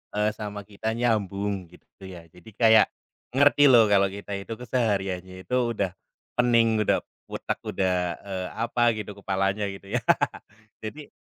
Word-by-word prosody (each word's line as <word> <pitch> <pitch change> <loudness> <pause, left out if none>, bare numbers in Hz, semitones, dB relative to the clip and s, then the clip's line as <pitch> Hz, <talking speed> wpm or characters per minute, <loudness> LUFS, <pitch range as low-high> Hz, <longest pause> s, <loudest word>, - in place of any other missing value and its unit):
eee, 105 +1 +2
sama 105 -1 -6
kita 110 +2 -4
nyambung 100 -5 -1
gitu 90 +2 -16
ya. 90 -3 -10
Jadi 90 +5 -15
kayak 110 -2 +6 0.5
ngerti 145 +1 +6
loh 120 -4 +8
kalau 100 -1 +5
kita 100 +1 -8
itu 115 +3 -6
kesehariannya 95 -6 -2
itu 125 - -2 0.2
udah 100 -3 -1 0.5
pening, 115 -2 +4
udah - - +2 0.2
otak - - -4
udah, 90 -2 0
eee, 95 -2 -4
apa 120 +2 0
gitu 105 -1 -5
kepalanya 95 +1 0
gitu 100 +1 -9
ya. - - -17 0.8
Jadi, 145 +7 -7
105 Hz, 145 wpm, -26 LUFS, 95-115 Hz, 0.8 s, loh